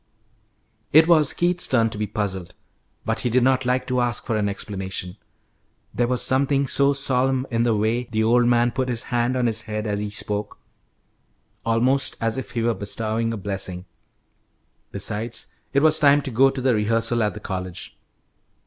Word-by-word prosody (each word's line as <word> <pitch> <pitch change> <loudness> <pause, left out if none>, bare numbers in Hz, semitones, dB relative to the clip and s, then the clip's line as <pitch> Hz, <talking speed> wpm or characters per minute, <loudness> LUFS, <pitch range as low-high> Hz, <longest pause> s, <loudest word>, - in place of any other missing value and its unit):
It 160 +2 +6
was 155 -4 +4
Keith's 175 0 +2
turn 115 -3 +2
to - - -7
be 105 - -1
puzzled, 95 -4 -4 0.5
but 110 +1 -1
he 125 - -1
did 125 +1 +2
not 130 0 +2
like 125 0 +1
to 125 0 0
ask 120 -3 -2
for 115 - -1
an 105 -1 0
explanation; 95 -2 -4 0.8
there 120 +1 +1
was 125 0 +1
something 140 +1 +2
so 140 +1 +3
solemn 130 -1 0
in 115 0 +1
the 115 -2 +2
way 110 +4 0
the 110 -2 -1
old 120 +2 +3
man 120 0 +3
put 130 0 -2
his 120 -2 -1
hand 120 +2 +1
on 125 - +1
his 115 -1 +1
head 105 0 -3
as 105 -1 -2
he 105 0 -3
spoke, 105 0 -4 1.1
almost 125 +4 +1
as 115 +2 -1
if 130 - -7
he 115 -2 -3
were 115 0 +2
bestowing 110 +2 -2
a 115 - -4
blessing. 95 -2 -4 1.1
Besides, 110 +2 -3 0.2
it 140 +1 +2
was 155 0 +5
time 145 0 +5
to 135 - -4
go 135 +4 +4
to 135 - -5
the 130 -1 +2
rehearsal 115 +2 +1
at 105 -1 0
the - - -6
college. 95 -3 -6
115 Hz, 185 wpm, -23 LUFS, 105-130 Hz, 1.1 s, It